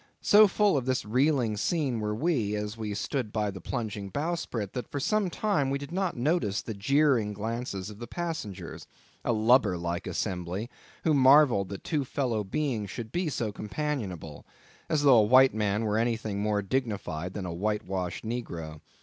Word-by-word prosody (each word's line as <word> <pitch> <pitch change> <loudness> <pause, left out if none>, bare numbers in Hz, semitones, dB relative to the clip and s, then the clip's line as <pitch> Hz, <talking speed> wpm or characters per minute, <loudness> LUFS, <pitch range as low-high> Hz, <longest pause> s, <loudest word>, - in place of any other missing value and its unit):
So 210 +1 +7
full 200 -3 +2
of 130 -2 -2
this 130 -3 0
reeling 125 -1 +2
scene 135 -1 0
were 105 0 -2
we, 115 -7 0
as 105 +1 -3
we 110 -2 -4
stood 110 +3 -2
by 105 -2 -1
the 95 -2 -9
plunging 105 -3 -4
bowsprit, 145 - -3
that 125 - -5
for 145 - -3
some 205 +6 +1
time 170 -8 0
we 140 - 0
did 140 +2 -8
not 185 -3 -1
notice 125 - +1
the 110 - -5
jeering 120 0 +2
glances 105 -2 -4
of 105 - -12
the 120 - -7
passengers, 110 - -5 0.4
a - - +1
lubber 110 -3 +4
like 85 +1 -3
assembly, 95 +4 -3 0.3
who 160 - +3
marvelled 130 -7 +5
that 100 - -7
two 150 -4 0
fellow 125 -5 -1
beings 110 -1 -2
should 110 +3 -6
be 175 +1 -1
so 115 -6 -2
companionable; 105 - -4 0.5
as 150 -2 +1
though 135 -5 +7
a - - +6
white 130 +5 +6
man 105 0 0
were 105 +1 +1
anything 110 -3 -1
more 105 -1 0
dignified 100 -7 -2
than 100 - -4
a 90 - -4
whitewashed 95 -1 -2
negro. 85 -10 -5
110 Hz, 175 wpm, -28 LUFS, 100-140 Hz, 0.5 s, So